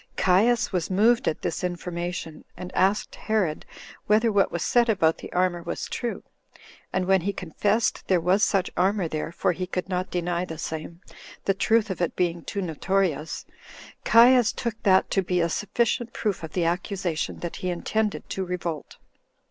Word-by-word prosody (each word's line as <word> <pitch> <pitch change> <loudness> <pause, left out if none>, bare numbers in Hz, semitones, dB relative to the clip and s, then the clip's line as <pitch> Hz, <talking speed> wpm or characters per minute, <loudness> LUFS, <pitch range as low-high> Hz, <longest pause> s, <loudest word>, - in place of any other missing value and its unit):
Caius 220 +6 +3
was 175 -3 -1
moved 220 +5 +3
at 155 - -1
this 170 - -2
information, 175 -2 -4
and 180 - -8
asked 195 +3 +1
Herod 205 -8 -1 0.4
whether 220 +2 +4
what 200 -2 +2
was 170 - -2
said 240 -1 +3
about 165 -7 +2
the - - -9
armor 180 -1 +1
was - - -4
true; 240 -2 -4 0.7
and 185 -1 0
when 190 0 +3
he 200 +4 -1
confessed 200 +4 -1
there 185 -2 +3
was 180 +4 +2
such 195 -2 +2
armor 190 0 +1
there, 155 +1 -4
for 170 - +1
he 180 +1 -4
could 180 0 -3
not 185 0 -2
deny 175 0 -1
the 165 -3 -6
same, 160 +1 -6 0.4
the 195 - +3
truth 215 +2 +2
of 180 - -5
it 175 - 0
being 170 -2 -1
too 200 - -3
notorious, 165 -1 -1 0.6
Caius 240 0 +6
took 235 -2 -3
that 190 -2 +3
to 195 - +2
be 180 -1 0
a 170 0 +2
sufficient 230 +5 -1
proof 205 -5 -2
of 160 -2 -8
the 175 -2 0
accusation, 175 -1 -2
that 170 - -5
he 185 - -3
intended 210 +4 -1
to 190 - -2
revolt. 175 -4 -5
185 Hz, 175 wpm, -25 LUFS, 170-205 Hz, 0.7 s, Caius